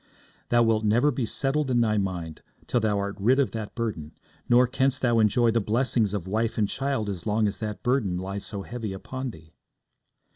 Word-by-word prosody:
'Thou 120 Hz, 0 st, +4 dB
wilt 110 Hz, -1 st, +2 dB
never 120 Hz, +7 st, +3 dB
be 120 Hz, -3 st, -2 dB
settled 140 Hz, +4 st, 0 dB
in 125 Hz, -1 st, +2 dB
thy 110 Hz, -2 st, +2 dB
mind 90 Hz, -6 st, -3 dB, 0.2 s
till 120 Hz, -, +1 dB
thou 110 Hz, -2 st, +1 dB
art 100 Hz, 0 st, -2 dB
rid 125 Hz, +7 st, +3 dB
of 140 Hz, -, +2 dB
that 110 Hz, -2 st, -6 dB
burden, 105 Hz, -11 st, -4 dB, 0.4 s
nor 125 Hz, +1 st, +6 dB
canst 130 Hz, +1 st, 0 dB
thou 120 Hz, -2 st, +3 dB
enjoy 115 Hz, +2 st, +3 dB
the 115 Hz, 0 st, +1 dB
blessings 110 Hz, -1 st, +1 dB
of 95 Hz, -4 st, -4 dB
wife 110 Hz, +3 st, -1 dB
and 105 Hz, -2 st, +2 dB
child 135 Hz, -5 st, -1 dB
as 95 Hz, -3 st, -5 dB
long 105 Hz, +1 st, +2 dB
as 100 Hz, -1 st, -4 dB
that 105 Hz, -2 st, -5 dB
burden 120 Hz, -8 st, +1 dB
lies 95 Hz, +2 st, -5 dB
so 100 Hz, -2 st, -4 dB
heavy 115 Hz, -4 st, -5 dB
upon 130 Hz, +7 st, -5 dB
thee.' 80 Hz, -6 st, -14 dB
110 Hz, 205 wpm, -26 LUFS, 100-125 Hz, 0.4 s, nor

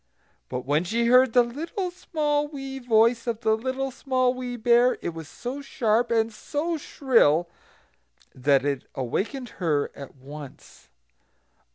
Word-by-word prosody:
But 125 Hz, -1 st, -4 dB
when 145 Hz, +4 st, +2 dB
she 230 Hz, +6 st, 0 dB
heard 250 Hz, 0 st, +5 dB
the 245 Hz, -, +6 dB
little, 330 Hz, +9 st, -4 dB
small, 295 Hz, -5 st, -1 dB
wee 270 Hz, -2 st, -7 dB
voice 235 Hz, 0 st, +3 dB
of 230 Hz, -1 st, -2 dB
the 220 Hz, -2 st, +3 dB
Little 260 Hz, +3 st, -3 dB
Small 255 Hz, -1 st, +1 dB
Wee 250 Hz, -1 st, -5 dB
Bear, 240 Hz, +2 st, +4 dB
it -, -, -1 dB
was 160 Hz, -2 st, -8 dB
so 250 Hz, -, -6 dB
sharp, 235 Hz, -3 st, +1 dB
and 225 Hz, -1 st, +1 dB
so 320 Hz, +8 st, -2 dB
shrill, 230 Hz, -, +2 dB, 0.9 s
that 135 Hz, +1 st, +2 dB
it 140 Hz, -3 st, -1 dB
awakened 220 Hz, -, -3 dB
her 150 Hz, -4 st, +1 dB
at 140 Hz, -1 st, -10 dB
once. 135 Hz, -, -12 dB
235 Hz, 145 wpm, -25 LUFS, 165-265 Hz, 0.9 s, the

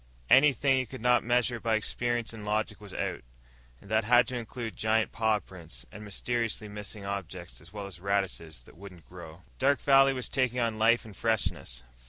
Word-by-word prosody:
Anything 135 Hz, -1 st, +5 dB
he 130 Hz, -1 st, -1 dB
could 130 Hz, -, -9 dB
not 125 Hz, 0 st, +3 dB
measure 120 Hz, 0 st, +1 dB
by 115 Hz, 0 st, +1 dB
experience 120 Hz, +2 st, -1 dB
and 110 Hz, -2 st, -9 dB
logic 105 Hz, +1 st, -2 dB
was 105 Hz, -2 st, -11 dB
out. -, -, -3 dB, 0.6 s
And 100 Hz, -, -15 dB
that 110 Hz, 0 st, +3 dB
had 120 Hz, +1 st, +5 dB
to 130 Hz, -, -4 dB
include 115 Hz, -1 st, -5 dB
giant 110 Hz, 0 st, +1 dB
paw 110 Hz, -1 st, +2 dB
prints 85 Hz, -11 st, -11 dB
and 105 Hz, -, -10 dB
mysteriously 110 Hz, +1 st, -2 dB
missing 105 Hz, 0 st, -8 dB
objects 90 Hz, -3 st, -6 dB
as -, -, -14 dB
well 105 Hz, -1 st, -6 dB
as 95 Hz, -3 st, -10 dB
radishes 95 Hz, -8 st, -2 dB
that -, -, -18 dB
wouldn't 90 Hz, -7 st, -13 dB
grow. 80 Hz, +7 st, -11 dB, 0.2 s
Dark 140 Hz, +2 st, +3 dB
Valley 135 Hz, -1 st, +5 dB
was 125 Hz, -2 st, -3 dB
taking 130 Hz, -2 st, 0 dB
on 115 Hz, -2 st, -1 dB
life 115 Hz, +2 st, +4 dB
and 105 Hz, -3 st, -11 dB
freshness. 100 Hz, -, -1 dB
110 Hz, 190 wpm, -29 LUFS, 100-120 Hz, 0.6 s, Anything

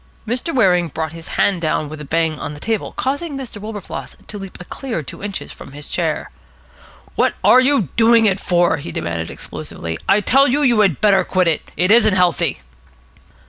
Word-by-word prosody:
Mr. 245 Hz, +8 st, -1 dB
Waring 180 Hz, -, +3 dB
brought 160 Hz, 0 st, -4 dB
his 165 Hz, 0 st, -10 dB
hand 190 Hz, -4 st, +2 dB
down 155 Hz, -1 st, 0 dB
with 155 Hz, +1 st, -8 dB
a -, -, -7 dB
bang 160 Hz, 0 st, 0 dB
on 150 Hz, -, -5 dB
the -, -, -10 dB
table, 220 Hz, +4 st, -2 dB
causing 285 Hz, +2 st, -2 dB
Mr. 240 Hz, -6 st, -8 dB
Wilberfloss 210 Hz, -2 st, -7 dB
to 205 Hz, -, -6 dB
leap 195 Hz, -1 st, -9 dB
a 180 Hz, -, -9 dB
clear 235 Hz, -, -5 dB
two -, -, -9 dB
inches 200 Hz, -1 st, -5 dB
from 135 Hz, -, -12 dB
his 145 Hz, 0 st, -9 dB
chair. -, -, -2 dB, 0.8 s
"What -, -, +1 dB
are 255 Hz, -, +7 dB
you 255 Hz, -, +2 dB
doing 230 Hz, 0 st, +5 dB
it 195 Hz, -2 st, +2 dB
for?" 175 Hz, -3 st, +2 dB
he 140 Hz, -12 st, -7 dB
demanded 85 Hz, -1 st, -3 dB
explosively. 80 Hz, -1 st, -6 dB
"I 200 Hz, -, +5 dB
tell 270 Hz, +6 st, +4 dB
you, 290 Hz, +4 st, +1 dB
you 240 Hz, -5 st, +4 dB
had 190 Hz, -9 st, +2 dB
better 200 Hz, -2 st, +4 dB
quit 185 Hz, -2 st, +1 dB
it. 160 Hz, -3 st, 0 dB
It 180 Hz, +3 st, +2 dB
isn't 215 Hz, -3 st, +5 dB
healthy." 175 Hz, -, +1 dB
195 Hz, 195 wpm, -19 LUFS, 160-230 Hz, 0.8 s, are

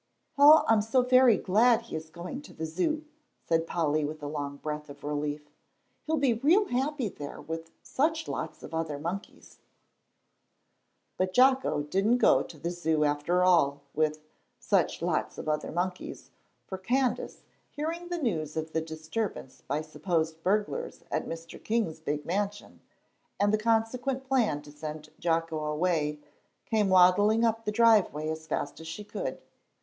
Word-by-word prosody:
"Oh, 295 Hz, +2 st, +8 dB
I'm 225 Hz, -2 st, +5 dB
so 235 Hz, +4 st, +2 dB
very 255 Hz, -2 st, +6 dB
glad 225 Hz, +4 st, +3 dB
he 230 Hz, -, -8 dB
is 160 Hz, 0 st, -6 dB
going 180 Hz, -, -7 dB
to 290 Hz, -, -14 dB
the 160 Hz, -, -4 dB
Zoo," 185 Hz, -, -1 dB, 0.4 s
said 165 Hz, 0 st, +1 dB
Polly, 155 Hz, -2 st, 0 dB
with 150 Hz, +1 st, -5 dB
a -, -, -3 dB
long 145 Hz, -1 st, -4 dB
breath 150 Hz, 0 st, -5 dB
of 140 Hz, 0 st, -12 dB
relief, 150 Hz, 0 st, -3 dB, 0.6 s
"he'll 320 Hz, 0 st, +1 dB
be 275 Hz, -4 st, +3 dB
real 325 Hz, -, +3 dB
happy 265 Hz, 0 st, 0 dB
there 145 Hz, -7 st, -8 dB
with 165 Hz, 0 st, -6 dB
such 315 Hz, +3 st, 0 dB
lots -, -, -5 dB
of -, -, -9 dB
other 160 Hz, -3 st, -2 dB
monkeys." 175 Hz, +7 st, -7 dB, 1.6 s
But 185 Hz, 0 st, 0 dB
Jocko 260 Hz, -, +4 dB
didn't 195 Hz, +10 st, +2 dB
go -, -, +5 dB
to 165 Hz, -, -9 dB
the 170 Hz, +4 st, -3 dB
Zoo 160 Hz, -3 st, 0 dB
after 150 Hz, +5 st, +1 dB
all 145 Hz, -6 st, +3 dB
with 155 Hz, 0 st, 0 dB, 0.3 s
"such -, -, 0 dB
lots -, -, -1 dB
of -, -, -7 dB
other 150 Hz, 0 st, -1 dB
monkeys," 180 Hz, +2 st, -4 dB, 0.3 s
for 190 Hz, -, -6 dB
Candace, 255 Hz, +6 st, -1 dB, 0.3 s
hearing 330 Hz, +4 st, -4 dB
the 350 Hz, 0 st, -3 dB
news 160 Hz, -, -2 dB
of 160 Hz, 0 st, -3 dB
the 160 Hz, -, +1 dB
disturbance 160 Hz, 0 st, -5 dB
by 145 Hz, +3 st, -1 dB
supposed 160 Hz, 0 st, -2 dB
burglars 210 Hz, -, -1 dB
at -, -, -1 dB
Mr. 165 Hz, 0 st, -8 dB
King's 215 Hz, -9 st, -1 dB
big 150 Hz, -1 st, -3 dB
mansion, 205 Hz, +3 st, -3 dB, 0.6 s
and 205 Hz, +1 st, +3 dB
the -, -, +4 dB
consequent 230 Hz, +4 st, 0 dB
plan 235 Hz, -, +1 dB
to 145 Hz, -, -12 dB
send 155 Hz, +1 st, -7 dB
Jocko 165 Hz, -2 st, 0 dB
away, 150 Hz, -1 st, 0 dB, 0.5 s
came 215 Hz, -3 st, +1 dB
waddling 205 Hz, +5 st, +5 dB
up 225 Hz, 0 st, 0 dB
the 210 Hz, -, 0 dB
driveway 210 Hz, -9 st, +3 dB
as 160 Hz, 0 st, -5 dB
fast 145 Hz, -1 st, -3 dB
as 160 Hz, -, -9 dB
she 165 Hz, +6 st, -6 dB
could. -, -, -5 dB
180 Hz, 160 wpm, -29 LUFS, 155-230 Hz, 1.6 s, Oh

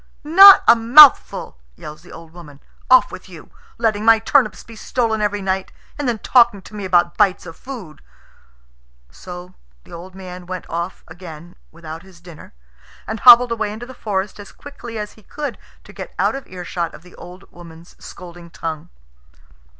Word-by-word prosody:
"Not 385 Hz, +6 st, +8 dB
a 230 Hz, -, +7 dB
mouthful!" 250 Hz, -, +5 dB, 0.2 s
yells 150 Hz, -, -12 dB
the 175 Hz, -, -18 dB
old 165 Hz, -1 st, -14 dB
woman. 150 Hz, -5 st, -15 dB, 0.3 s
"Off 255 Hz, 0 st, +4 dB
with 185 Hz, -, -12 dB
you. 170 Hz, -4 st, -15 dB, 0.3 s
Letting 215 Hz, -2 st, -1 dB
my 225 Hz, 0 st, +5 dB
turnips 225 Hz, 0 st, 0 dB
be 230 Hz, -, -15 dB
stolen 220 Hz, -1 st, -3 dB
every 205 Hz, -1 st, -2 dB
night, 190 Hz, 0 st, -3 dB, 0.2 s
and 290 Hz, -4 st, -3 dB
then 235 Hz, -, -2 dB
talking 235 Hz, -4 st, +2 dB
to -, -, -16 dB
me 205 Hz, -2 st, -7 dB
about 175 Hz, -2 st, 0 dB
bites 200 Hz, -4 st, +1 dB
of 165 Hz, -1 st, -11 dB
food!" 225 Hz, -, -11 dB, 1.1 s
So 180 Hz, -, -12 dB, 0.3 s
the -, -, -17 dB
old 180 Hz, +2 st, -12 dB
man 180 Hz, -2 st, -11 dB
went 185 Hz, -1 st, -8 dB
off 170 Hz, +2 st, -6 dB
again 170 Hz, 0 st, -13 dB, 0.2 s
without 160 Hz, 0 st, -11 dB
his 185 Hz, -2 st, -19 dB
dinner, 170 Hz, -3 st, -15 dB, 0.5 s
and 220 Hz, 0 st, -6 dB
hobbled 245 Hz, 0 st, +7 dB
away 220 Hz, -2 st, -3 dB
into 220 Hz, +3 st, -9 dB
the 260 Hz, -, -13 dB
forest 205 Hz, -4 st, -5 dB
as 205 Hz, -, -12 dB
quickly 240 Hz, -5 st, -11 dB
as 210 Hz, -1 st, -6 dB
he 220 Hz, -, -21 dB
could 290 Hz, +5 st, -8 dB, 0.2 s
to -, -, -16 dB
get -, -, -10 dB
out -, -, 0 dB
of 270 Hz, 0 st, -9 dB
earshot 175 Hz, -2 st, -6 dB
of -, -, -16 dB
the 180 Hz, -, -18 dB
old 180 Hz, +2 st, -14 dB
woman's 170 Hz, -1 st, -16 dB
scolding 175 Hz, -1 st, -13 dB
tongue. 160 Hz, -2 st, -7 dB
190 Hz, 175 wpm, -18 LUFS, 175-230 Hz, 1.1 s, Not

